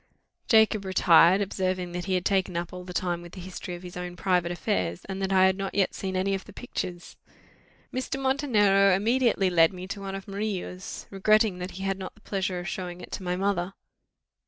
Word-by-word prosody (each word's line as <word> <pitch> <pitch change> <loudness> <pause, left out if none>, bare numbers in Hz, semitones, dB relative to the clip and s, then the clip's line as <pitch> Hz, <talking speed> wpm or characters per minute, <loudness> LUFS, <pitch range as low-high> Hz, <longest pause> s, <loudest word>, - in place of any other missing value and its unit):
Jacob 220 -2 +4
retired, 185 0 +5
observing 185 -2 -1
that 175 0 -4
he 190 -1 0
had 180 - -1
taken 190 -3 +1
up 170 0 -4
all 180 0 -7
the 180 - -8
time 175 -1 -1
with 175 0 -12
the 190 - -8
history 180 0 -6
of 175 - -11
his 180 -1 -9
own 180 0 -5
private 180 -1 +1
affairs, 185 0 -2
and 195 0 -5
that 195 0 -1
I 190 -1 +6
had 190 0 +3
not 195 0 -4
yet 195 -2 +2
seen 190 -1 -4
any 190 +1 +1
of 195 - -3
the 205 - -13
pictures. 180 -6 -6 0.8
Mr. 255 +1 -3
Montenero 210 -8 +4
immediately 220 -2 +2
led 165 -2 +5
me 180 0 -7
to 200 0 -5
one 195 0 -5
of 195 - -8
Murillo's, 195 -2 -4
regretting 210 0 +3
that 180 +1 -4
he 190 - -5
had 195 0 -1
not 190 - -7
the 215 - -22
pleasure 190 -3 -2
of 175 - -6
showing 180 -1 -5
it - - -11
to - - -5
my 180 -1 -1
mother. 195 -1 -1
190 Hz, 215 wpm, -27 LUFS, 180-200 Hz, 0.8 s, I